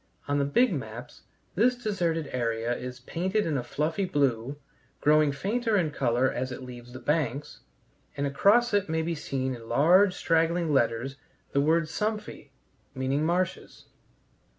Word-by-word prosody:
On 145 0 +1
the 140 - +2
big 235 - +3
maps 120 +1 -7 0.3
this 245 +6 +3
deserted 175 -10 -1
area 115 -1 -1
is 125 0 -7
painted 185 +10 -1
in 155 - -1
a 135 - 0
fluffy 155 +9 -2
blue, 140 -5 0 0.4
growing 150 0 +4
fainter 215 - 0
in 165 -5 +1
color 125 -1 +1
as 130 +1 -3
it 125 - -7
leaves 125 -1 -10
the - - -7
banks, 150 -2 -2 0.6
and 140 - 0
across 205 - +3
it 205 -5 +1
may 160 0 0
be 170 +1 -1
seen 130 -4 -3
in 115 -2 -10
large 180 +6 +5
straggling 165 -1 +1
letters 125 +1 0 0.3
the 140 - +2
word 160 +3 +3
Sümpfe, 210 -1 -4 0.5
meaning 135 +3 0
marshes. 175 +3 -2
150 Hz, 150 wpm, -27 LUFS, 130-180 Hz, 0.6 s, large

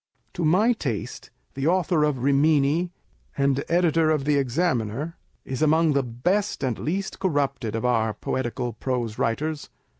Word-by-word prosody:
To 175 - -3
my 190 +10 +4
taste, 125 - -5 0.2
the 135 +2 -2
Author 175 -3 +2
of 140 -5 0
Rimini, 145 +4 +3 0.5
and 140 0 +1
Editor 165 -2 +3
of 150 -3 +1
the 145 0 +2
Examiner,2 140 0 0 0.3
is 130 +2 -4
among 155 0 +4
the 140 - +2
best 140 - -1
and 125 -3 -1
least 190 +6 -3
corrupted 140 - -1
of 115 - -2
our 110 -3 +1
poetical 120 0 -3
prose 120 -1 -3
writers. 150 +6 -2
145 Hz, 145 wpm, -24 LUFS, 125-165 Hz, 0.5 s, my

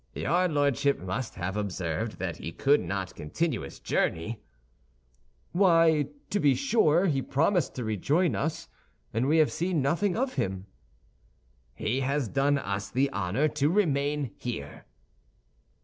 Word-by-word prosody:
"Your 180 +2 +1
Lordship 145 -3 +1
must 95 +7 -4
have 95 +2 -3
observed 100 0 -3
that 90 -3 -4
he 80 - -6
could 140 - +3
not 95 -2 -4
continue 155 - -2
his 70 - -9
journey." 105 +8 -1 1.1
"Why, 165 -5 +4 0.2
to 205 - +1
be 145 -6 +4
sure, 195 - +3
he 140 -7 +1
promised 160 +5 +1
to 125 - -3
rejoin 140 - +1
us, 155 +2 -2 0.5
and 115 +4 +1
we 155 +3 +3
have 155 -2 +4
seen 175 -1 -1
nothing 175 +8 +1
of 255 +1 0
him." 95 - -2 1.1
"He 120 +5 -1
has 135 -1 0
done 140 +5 +2
us 100 -6 -3
the 135 +6 +1
honor 100 +8 0
to 145 0 +1
remain 145 - +1
here." 105 -13 -6
140 Hz, 140 wpm, -28 LUFS, 105-160 Hz, 1.1 s, Why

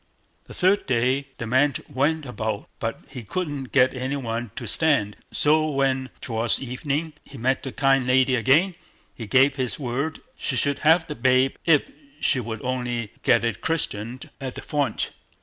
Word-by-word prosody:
The - - -11
third 190 +3 +2
day, 130 +2 +1
the 115 - -4
man 130 +4 +2
went 145 +3 0
about, 110 -4 -4
but 115 0 -3
he 125 - -8
couldn't 145 - -3
get 130 +1 +4
any 130 +2 -3
one 120 -3 -3
to 120 - -5
stand; 115 -4 +2 0.2
and - - -7
so 155 +1 +3
when, 135 -2 0
towards 115 -1 +1
evening, 140 +5 -3
he 140 - -12
met 130 +3 0
the 135 - -5
kind 135 -1 +2
lady 130 +1 +4
again, 140 - +3 0.4
he 115 - -8
gave 135 +3 +4
his 130 -3 -2
word 140 +4 -3 0.2
she 130 - -1
should 140 +3 +1
have 165 +2 +4
the 150 - -5
babe 130 +1 +2
if 165 - +4 0.3
she 130 - +2
would 110 -2 -5
only 125 -3 -2
get 115 - +3
it 115 -2 -2
christened 125 -6 -2
at 130 -2 -5
the - - -7
font. 145 -6 -1
130 Hz, 175 wpm, -24 LUFS, 120-145 Hz, 0.4 s, get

